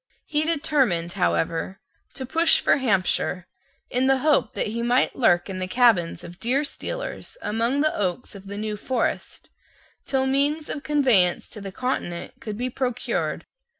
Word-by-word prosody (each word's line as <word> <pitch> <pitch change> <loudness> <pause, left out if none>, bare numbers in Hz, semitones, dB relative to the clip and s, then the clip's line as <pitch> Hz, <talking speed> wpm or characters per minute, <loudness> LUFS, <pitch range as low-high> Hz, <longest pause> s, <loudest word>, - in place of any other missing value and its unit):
He 300 0 0
determined, 270 - +1
however, 85 - -1 0.4
to 260 - -4
push 325 +6 +4
for - - +3
Hampshire, 190 -6 0 0.5
in 255 +1 +2
the 270 0 +4
hope 300 +2 +2
that - - 0
he 225 +2 -3
might 245 +2 +2
lurk 175 -9 +3
in 190 -2 -5
the 185 - -2
cabins 220 -6 +3
of 175 +1 -11
deerstealers 295 - -3
among 235 - 0
the 310 0 +2
oaks 195 +5 -2
of 200 -1 -11
the 200 +1 -6
New 210 0 -3
Forest, 250 +2 -2 0.6
till 265 -1 +1
means 285 +3 +1
of 290 - -3
conveyance 255 - +3
to 210 - -8
the 195 -1 -6
Continent 185 -7 -3
could 210 -2 -5
be 250 +2 -2
procured. 250 -1 -2
245 Hz, 155 wpm, -24 LUFS, 190-275 Hz, 0.6 s, push